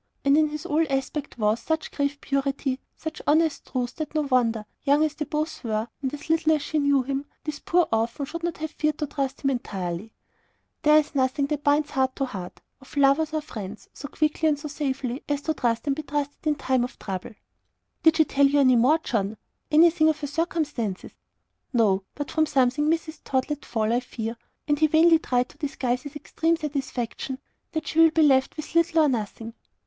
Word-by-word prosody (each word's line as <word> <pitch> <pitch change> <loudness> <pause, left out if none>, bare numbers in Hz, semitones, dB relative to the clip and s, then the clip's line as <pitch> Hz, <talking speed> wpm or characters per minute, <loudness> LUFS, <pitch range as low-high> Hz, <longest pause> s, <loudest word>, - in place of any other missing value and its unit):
And 280 +1 +5
in 310 0 +4
his 300 0 -5
whole 310 +2 +2
aspect 270 +1 -2
was 215 0 +1
such 320 0 -2
grave 285 0 -1
purity, 275 -1 -1 0.2
such 315 -1 -6
honest 315 +1 +2
truth, 250 -1 -2
that 310 -1 -5
no 305 - +3
wonder, 240 -6 +1 0.2
young 290 +1 +4
as 310 -1 0
they 300 0 -4
both 305 +1 -3
were, 220 0 -2
and 265 -2 -1
little 315 +2 +1
as 300 -2 0
she 310 - -1
knew 285 -1 +3
of - - -8
him, 275 +1 -3 0.2
this 300 -2 -4
poor 350 0 +2
orphan 230 +5 0
should 335 +4 -6
not 345 -1 -2
have 315 0 -4
feared 305 -1 -1
to 300 - -1
trust 275 -1 -3
him 275 - +2
entirely. 190 -7 -3
And 225 - -22 0.7
there 300 0 +6
is 305 0 +1
nothing 270 +1 +1
that 295 0 -3
binds 290 +1 +2
heart 265 -2 +1
to 275 - -1
heart, 190 -8 -8 0.2
of 265 - -13
lovers 285 +3 +4
or 310 0 -1
friends, 215 -7 -8
so 285 - -7
quickly 310 +2 +1
and 295 - +1
so 290 - -6
safely, 270 -3 -3
as 290 0 -1
to 315 - 0
trust 235 -4 -1
and 280 -2 +1
be 310 - -4
trusted 290 +1 -4
in 300 - +3
time 260 -3 +1
of 250 - -6
trouble. 195 +2 -6 0.7
"Did 320 0 +5
she 315 - +5
tell 280 -1 +4
you 285 +1 +2
any 255 -2 +5
more, 260 +7 +5
John? 220 -8 -2 0.3
Anything 315 0 +5
of 310 -1 0
her - - -2
circumstances?" 290 - -2 0.6
"No. 210 -5 +3
But 290 -1 -5
from 315 -1 +2
something 285 +1 +2
Mrs. 320 -1 -1
Tod 260 +2 -1
let 295 - -4
fall, 220 -1 0
I 240 - +3
fear" 230 -2 -5 0.3
and 295 -1 +1
he 310 - +5
vainly 325 +1 +5
tried 250 -5 0
to - - -19
disguise 255 -4 -1
his 285 +2 -9
extreme 325 +3 0
satisfaction 270 -4 -4 0.4
"that 315 -1 -2
she 320 - 0
will 325 0 +8
be 320 0 +3
left 265 -1 +3
with 310 +1 -7
little 335 -1 +4
or - - +4
nothing." 225 -2 -3
285 Hz, 210 wpm, -25 LUFS, 255-310 Hz, 0.7 s, will